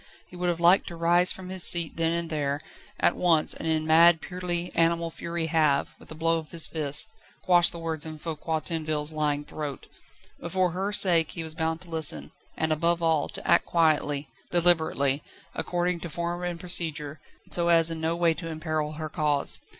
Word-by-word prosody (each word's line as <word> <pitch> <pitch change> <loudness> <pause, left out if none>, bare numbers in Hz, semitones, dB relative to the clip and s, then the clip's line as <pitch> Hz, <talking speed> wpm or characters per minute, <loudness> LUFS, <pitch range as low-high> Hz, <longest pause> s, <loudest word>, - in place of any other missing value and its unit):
He - - -15
would 180 0 -1
have 170 -1 -2
liked 175 +3 +4
to 175 - -7
rise 175 +2 +3
from 185 -1 -7
his 185 -1 -2
seat 170 -2 +3
then 165 0 0
and 170 -1 -3
there, 145 -2 -1 0.4
at - - +2
once, 165 -4 +3
and - - -6
in 160 -1 0
mad, 165 +1 +6
purely 180 -1 -3
animal 170 0 +1
fury 170 0 -4
have, 155 -3 +1
with - - -17
a 155 - -8
blow 165 +1 +1
of 155 -2 -11
his 165 -2 +2
fist, 150 -2 -2 0.4
quashed 175 -1 +4
the 170 - -8
words 165 -2 -2
in 155 -1 -6
Foucquier 160 0 -3
Tinville's 155 -1 -2
lying 150 -1 -1
throat. 145 -3 -6 0.5
But 170 - -7
for 185 -2 +2
her 190 +4 -2
sake 170 -6 +4
he 165 - -5
was 160 -1 -6
bound 160 0 -2
to 180 - -10
listen, 135 - +1 0.3
and, 160 0 0
above 170 +2 +1
all, 160 -2 +1
to - - -5
act - - +3
quietly, 150 -3 +1 0.2
deliberately, 160 -5 +2 0.3
according 175 0 -1
to 170 - -7
form 170 +2 -4
and 175 -1 -4
procedure, 155 -4 -2 0.3
so 170 -1 0
as 165 -1 +4
in 160 -1 -5
no 165 +1 0
way 170 -1 +2
to 165 +2 -7
imperil 155 -1 -3
her 155 0 -5
cause. 150 -1 0
165 Hz, 195 wpm, -26 LUFS, 155-170 Hz, 0.5 s, mad